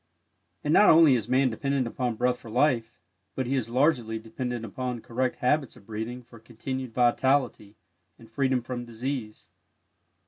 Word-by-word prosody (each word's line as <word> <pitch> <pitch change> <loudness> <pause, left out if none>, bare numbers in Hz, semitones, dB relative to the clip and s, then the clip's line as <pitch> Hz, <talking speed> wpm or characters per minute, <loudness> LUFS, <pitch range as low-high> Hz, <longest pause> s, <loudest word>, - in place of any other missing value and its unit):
And 150 - +1
not 210 - +7
only 160 -3 +7
is 115 -2 -1
Man 130 0 +3
dependent 135 +3 -1
upon 120 0 -2
Breath 125 +2 0
for 120 -3 -12
life, 120 -1 +1 0.4
but 130 - -1
he 130 - -2
is 125 -4 -1
largely 120 -3 +1
dependent 120 +1 -5
upon 125 +2 -4
correct 125 +3 -2
habits 135 +2 0
of 105 - -18
breathing 115 +3 -5
for 115 -1 -16
continued 125 +3 -6
vitality 125 -3 +1 0.4
and 115 - -16
freedom 130 +1 0
from 120 0 -5
disease. 120 -1 -5
125 Hz, 160 wpm, -27 LUFS, 115-130 Hz, 0.4 s, not